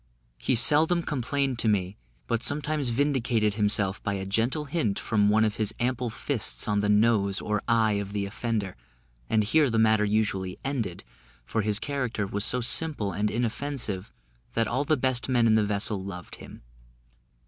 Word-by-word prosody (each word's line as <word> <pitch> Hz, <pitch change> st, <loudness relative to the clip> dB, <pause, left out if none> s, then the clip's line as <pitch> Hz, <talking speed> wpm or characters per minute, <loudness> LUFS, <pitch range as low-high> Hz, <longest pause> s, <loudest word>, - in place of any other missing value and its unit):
He 130 Hz, -, 0 dB
seldom 160 Hz, +8 st, +5 dB
complained 135 Hz, -2 st, -2 dB
to 115 Hz, -, +1 dB
me, 95 Hz, -2 st, 0 dB, 0.3 s
but 115 Hz, -, -1 dB
sometimes 145 Hz, 0 st, 0 dB
vindicated 120 Hz, -5 st, +1 dB
himself 100 Hz, -2 st, 0 dB
by 100 Hz, -, -2 dB
a 95 Hz, 0 st, -4 dB
gentle 115 Hz, +10 st, 0 dB
hint 140 Hz, -9 st, -1 dB
from 105 Hz, -2 st, +1 dB
one 110 Hz, +1 st, +3 dB
of 105 Hz, 0 st, -2 dB
his 110 Hz, -1 st, -1 dB
ample 125 Hz, 0 st, -1 dB
fists 115 Hz, -1 st, -1 dB
on 105 Hz, -1 st, +1 dB
the 105 Hz, 0 st, 0 dB
nose 105 Hz, -2 st, +2 dB
or 105 Hz, 0 st, -2 dB
eye 115 Hz, -2 st, +3 dB
of 100 Hz, 0 st, -7 dB
the 100 Hz, -1 st, -2 dB
offender, 105 Hz, -1 st, -3 dB, 0.5 s
and 110 Hz, -1 st, +2 dB
here 145 Hz, +6 st, +3 dB
the 115 Hz, -, -1 dB
matter 110 Hz, -1 st, +3 dB
usually 105 Hz, -3 st, -1 dB
ended, 115 Hz, -11 st, -3 dB, 0.4 s
for 110 Hz, -, -1 dB
his 105 Hz, -1 st, +2 dB
character 125 Hz, -5 st, -2 dB
was 100 Hz, +1 st, -2 dB
so 125 Hz, +4 st, +1 dB
simple 125 Hz, -4 st, +1 dB
and 105 Hz, +2 st, -1 dB
inoffensive, 115 Hz, -3 st, -2 dB, 0.4 s
that 115 Hz, -1 st, +1 dB
all 130 Hz, +6 st, -1 dB
the 155 Hz, +1 st, +2 dB
best 130 Hz, 0 st, -1 dB
men 120 Hz, -2 st, +3 dB
in 110 Hz, -, +4 dB
the 110 Hz, -1 st, +3 dB
vessel 100 Hz, -1 st, 0 dB
loved 90 Hz, -2 st, -8 dB
him. -, -, -13 dB
110 Hz, 175 wpm, -26 LUFS, 105-130 Hz, 0.5 s, seldom